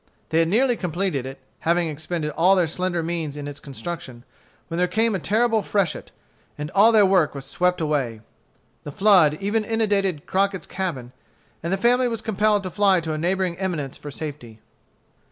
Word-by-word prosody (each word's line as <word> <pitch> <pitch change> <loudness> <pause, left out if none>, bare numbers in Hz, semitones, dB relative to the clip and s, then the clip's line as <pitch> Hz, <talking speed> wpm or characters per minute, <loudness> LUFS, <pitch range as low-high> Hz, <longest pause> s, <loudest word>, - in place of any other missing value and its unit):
They 160 - +2
had 165 - +3
nearly 245 +7 +2
completed 175 - -2
it, 135 - -8 0.2
having 170 +1 +1
expended 155 +1 -4
all 180 +5 +4
their 180 -2 +3
slender 175 +1 -2
means 160 -3 -3
in 145 -1 -6
its 145 0 -7
construction, 140 -4 -7 0.4
when 165 - -4
there 180 - +3
came 220 +5 +1
a 195 - -1
terrible 225 +4 +2
freshet, 200 -4 -1 0.5
and 150 0 -5
all 210 +4 +6
their 215 -3 +6
works 185 -6 +2
were 140 - -5
swept 180 +7 0
away. 140 -8 -1 0.6
The 145 - -7
flood 180 -4 +4
even 205 +3 0
inundated 205 -7 0
Crockett's 195 0 0
cabin, 150 -11 -4 0.5
and 170 - -3
the 195 - +1
family 245 +4 +3
was 230 -2 -3
compelled 210 -1 +1
to 185 - -5
fly 195 -2 +3
to 160 -1 -3
a - - -3
neighboring 180 +1 -1
eminence 165 -8 -3
for 145 - -9
safety. 140 -7 -7
180 Hz, 180 wpm, -23 LUFS, 150-200 Hz, 0.6 s, all